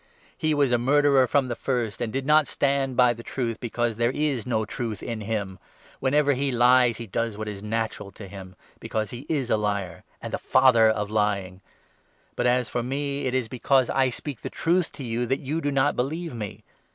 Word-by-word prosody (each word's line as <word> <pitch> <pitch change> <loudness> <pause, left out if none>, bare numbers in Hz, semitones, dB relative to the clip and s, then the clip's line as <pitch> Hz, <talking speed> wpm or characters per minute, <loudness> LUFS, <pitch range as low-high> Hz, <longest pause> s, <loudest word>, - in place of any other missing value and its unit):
He 155 -1 0
was 140 -3 +2
a 120 - +3
murderer 140 +1 +4
from 135 +2 +2
the 120 - -3
first, 120 -5 -2
and 115 -2 -2
did 135 +2 -3
not 150 0 +4
stand 135 -2 0
by 125 -1 +5
the 115 - -10
truth, 115 -2 -3
because 120 -2 -2
there 120 0 +2
is 135 -3 -1
no 110 -3 0
truth 110 -2 -5
in 115 -2 -4
him. 100 -3 -3 0.4
Whenever 145 +2 +3
he 135 +1 -1
lies, 125 -1 +4
he 115 - -6
does 115 +1 -2
what 110 0 -5
is 100 -2 -6
natural 110 -1 -3
to 100 - -10
him; 95 -1 -10 0.2
because 110 -2 -3
he 125 +4 -8
is 140 -6 -1
a 110 - +4
liar, 100 -5 -2 0.2
and - - -7
the - - -1
father 115 -4 +5
of 105 -1 -1
lying. 100 -3 -1 0.7
But, 120 - +1
as 125 -1 +2
for 120 - -2
me, 140 +3 -2
45 - - +1
it 130 0 +1
is 125 -3 -2
because 130 +1 +2
I 130 -1 +2
speak 130 0 -6
the - - -5
truth 175 +1 0
to 140 - -8
you 120 0 -2
that 135 +3 0
you 150 +4 -3
do 145 - -1
not 140 +1 +2
believe 160 +5 -2
me. 105 -4 -6
120 Hz, 215 wpm, -25 LUFS, 110-135 Hz, 0.7 s, by